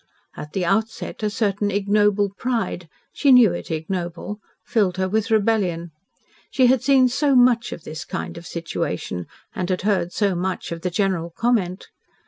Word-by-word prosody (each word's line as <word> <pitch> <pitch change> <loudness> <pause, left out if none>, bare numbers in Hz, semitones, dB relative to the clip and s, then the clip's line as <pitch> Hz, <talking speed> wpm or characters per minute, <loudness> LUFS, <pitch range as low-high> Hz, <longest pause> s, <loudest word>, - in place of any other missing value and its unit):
At 150 - -9
the 185 -2 -1
outset 220 +6 -1
a 215 - +1
certain 205 -1 0
ignoble 205 0 +2
pride 225 -9 -2 0.2
she 280 - +3
knew 240 -8 +7
it 175 - -6
ignoble 175 +4 -4 0.3
filled 205 -7 +1
her 190 0 0
with 215 +2 0
rebellion. 200 -6 +1 0.6
She 260 - +3
had 255 0 +4
seen 265 -1 +5
so 275 +2 +1
much 245 -1 +4
of 160 - -7
this 155 -1 -7
kind - - -5
of 170 0 -9
situation, 90 - -4 0.3
and 180 0 -3
had 185 0 -1
heard 190 -4 +1
so 200 -1 +1
much 180 +1 -3
of 165 0 -5
the 180 - -1
general 180 -2 0
comment. 190 -1 -1
195 Hz, 165 wpm, -22 LUFS, 175-225 Hz, 0.6 s, knew